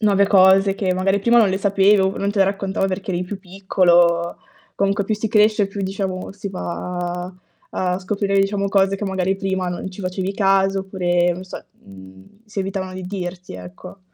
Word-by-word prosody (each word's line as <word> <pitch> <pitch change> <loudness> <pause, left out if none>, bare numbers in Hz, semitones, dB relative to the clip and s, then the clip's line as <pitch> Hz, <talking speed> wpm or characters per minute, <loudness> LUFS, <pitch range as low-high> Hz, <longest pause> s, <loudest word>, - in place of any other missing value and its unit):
nuove 200 -2 +3
cose, 195 0 +5
che 185 -3 -1
magari 195 +2 +1
prima 235 +3 +3
non 215 -4 +5
le 190 - -1
sapevo, 195 -1 +3
non 200 0 -1
te 205 - -3
le 195 - +6
raccontava 195 -1 -1
perché 190 0 -4
eri 175 0 -1
più 190 +2 -6
piccolo. 175 -2 +2 0.4
Comunque 200 0 0
più 215 +2 0
si 215 +1 -3
cresce 210 -1 +3
più, 195 0 -6
diciamo, 190 -1 -4
si 200 0 -7
va 180 -1 -4 0.4
a 180 0 -1
scoprire, 195 +1 -1
diciamo, 200 0 +1
cose 195 0 +2
che 205 - -5
magari 190 -1 -1
prima 190 -2 -2
non 175 +2 -5
ci 190 +2 -10
facevi 185 +1 -3
caso 195 -1 +2
oppure, 175 -2 0
non 185 +2 -8
so, 185 - -9 0.8
si 210 -1 -8
evitavano 190 -1 -4
di 185 - -6
dirti 180 -1 -6
ecco. 90 - -11
195 Hz, 185 wpm, -20 LUFS, 185-200 Hz, 0.8 s, le